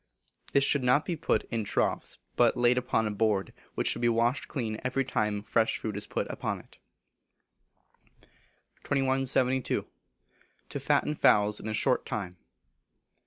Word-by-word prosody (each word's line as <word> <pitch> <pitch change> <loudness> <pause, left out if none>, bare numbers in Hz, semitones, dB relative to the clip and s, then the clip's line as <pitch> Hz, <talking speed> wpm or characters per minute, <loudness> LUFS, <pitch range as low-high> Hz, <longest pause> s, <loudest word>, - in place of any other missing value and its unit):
This 140 - +4
should 140 0 +3
not 125 +4 +3
be 175 - -2
put - - 0
in 115 -2 -1
troughs, 105 - 0 0.2
but 120 -1 +3
laid 120 0 +4
upon 125 -3 0
a 105 - -1
board, 105 -2 0 0.2
which - - 0
should - - 0
be 120 - +3
washed 120 +3 +1
clean 110 -5 -4
every 130 +1 0
time 105 -4 -1
fresh 110 +1 +1
food 110 -2 -4
is 105 - -5
put - - -2
upon - - -3
it. - - -19 2.0
2172. 130 -1 +1 0.8
To - - -4
Fatten 150 - +1
Fowls 105 -7 +3
in - - -7
a 110 - -2
Short 125 +3 +1
Time. 90 -4 -5
120 Hz, 150 wpm, -29 LUFS, 105-130 Hz, 2.0 s, This